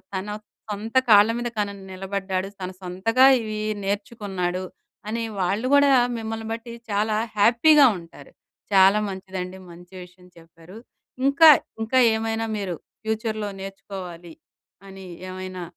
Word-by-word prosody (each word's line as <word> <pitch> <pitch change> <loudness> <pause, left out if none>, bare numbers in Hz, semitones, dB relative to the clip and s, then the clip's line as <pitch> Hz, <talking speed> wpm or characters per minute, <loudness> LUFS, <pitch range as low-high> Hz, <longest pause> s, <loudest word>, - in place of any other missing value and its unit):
తన 190 +2 -4 0.4
సొంత 215 +4 -6
కాళ్ళ 205 +1 +7
మీద 240 - -3
తను 205 -1 -1 0.2
నిలబడ్డాడు, 190 0 -3
తను 185 0 -5
సొంతగా 190 +8 +2 0.2
ఇవి 215 -1 -5 0.2
నేర్చుకున్నాడు” 195 -3 -3 0.5
అని 230 +1 -2 0.2
వాళ్ళు 200 +7 0
కూడా 285 -1 +5 0.3
మిమ్మల్ని 225 0 -5
బట్టి 230 +1 -8 0.2
చాలా 210 +1 0 0.2
హ్యాపీగా 270 +8 +6
ఉంటారు. 165 0 -15 0.4
చాలా 195 +2 +6
మంచిదండి, 190 -1 -6
మంచి 175 +2 -15
విషయం 180 0 -18
చెప్పారు. 165 +4 -15 0.5
ఇంకా, 280 +3 +7 0.3
ఇంకా 225 +4 0 0.2
ఏమైనా 225 0 -2
మీరు 190 -4 -3 0.3
ఫ్యూచర్‌లో 220 -1 -2
నేర్చుకోవాలి 185 -3 -9 0.5
అని 190 -1 -11 0.2
ఏమైనా 185 0 -7
200 Hz, 120 wpm, -23 LUFS, 185-225 Hz, 0.5 s, కాళ్ళ